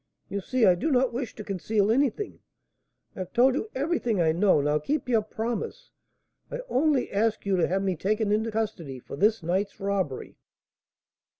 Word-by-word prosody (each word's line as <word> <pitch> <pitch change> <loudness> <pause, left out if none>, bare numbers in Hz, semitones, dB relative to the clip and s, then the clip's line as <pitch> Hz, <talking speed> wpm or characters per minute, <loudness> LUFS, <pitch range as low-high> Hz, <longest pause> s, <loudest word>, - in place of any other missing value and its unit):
You 200 0 -3
see 255 +3 +2
I 180 - +7
do 175 - -1
not 260 -3 +2
wish 245 0 -4
to 215 - -7
conceal 205 +2 0
anything, 280 - 0 0.8
I - - -9
have 185 -1 -6
told 255 +2 +5
you 425 +11 -3
everything 265 - 0
I 160 -2 +3
know. 180 0 +3
Now 150 +1 +1
keep 285 - -2
your 230 -3 +3
promise. 225 - -4 0.6
I - - -4
only 280 0 +2
ask 215 +2 0
you 200 -1 +2
to 175 - +2
have 190 +2 0
me 190 -2 0
taken 210 +5 0
into 220 +2 +1
custody 210 -11 -3
for 125 - -9
this 210 +4 +2
night's 190 +4 -1
robbery." 195 -8 -2
215 Hz, 180 wpm, -27 LUFS, 190-245 Hz, 0.8 s, I